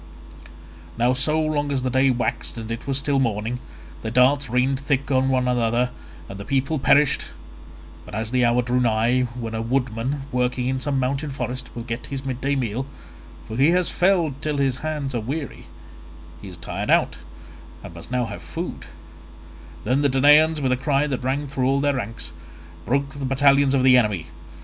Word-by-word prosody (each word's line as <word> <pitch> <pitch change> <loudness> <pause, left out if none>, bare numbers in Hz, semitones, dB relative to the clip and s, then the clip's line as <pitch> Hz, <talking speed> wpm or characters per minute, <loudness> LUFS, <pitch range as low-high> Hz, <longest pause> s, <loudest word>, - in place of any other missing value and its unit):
Now 120 +2 +3
so 150 +4 +1
long 150 -2 0
as 135 -2 -1
the 130 - -1
day 130 +2 +3
waxed 120 -1 -2
and 115 0 -6
it 115 +5 -5
was 135 -1 +1
still 140 0 +1
morning, 115 0 -1 0.4
their 110 - -4
darts 130 +3 +3
rained 130 +2 +1
thick 140 -1 -1
on 130 0 +2
one 130 -1 +1
another 120 0 +1 0.4
and 100 - -8
the - - -5
people 135 +6 0
perished, 145 +1 +3 0.8
but - - -9
as 110 +1 -3
the 125 -1 +2
hour 120 +1 +3
drew 125 +1 0
nigh 120 +2 +2
when 115 -1 -5
a 110 - -2
woodman 125 +2 -1
working 125 0 0
in 130 0 -1
some 135 0 -1
mountain 135 +3 -1
forest 130 -2 -5
will 120 - -5
get 115 0 -5
his 135 -1 -6
midday 135 +2 -1
meal—for 115 - -6
he 140 +4 +5
has 180 0 +2
felled 170 -7 +1
till 150 -2 -2
his 135 -2 +1
hands 150 -4 -3
are 120 - -1
weary; 140 +6 -5 0.7
he 100 - -9
is 90 -2 -10
tired 85 - -5
out, - - +3 0.7
and - - -9
must 85 +4 -11
now 125 -1 0
have 110 -3 -7
food—then 80 - -7
the 145 - +3
Danaans 150 +4 +5
with 130 -2 +1
a 125 - +2
cry 140 +2 +1
that 135 -4 -3
rang 135 +3 -1
through 135 -2 -1
all 135 +1 +2
their 145 0 +1
ranks, 115 -3 -5 0.6
broke 140 +2 0
the 140 -1 -5
battalions 140 +1 +4
of 130 - +2
the 130 -1 +7
enemy. 105 -8 -1
130 Hz, 185 wpm, -23 LUFS, 120-140 Hz, 0.8 s, the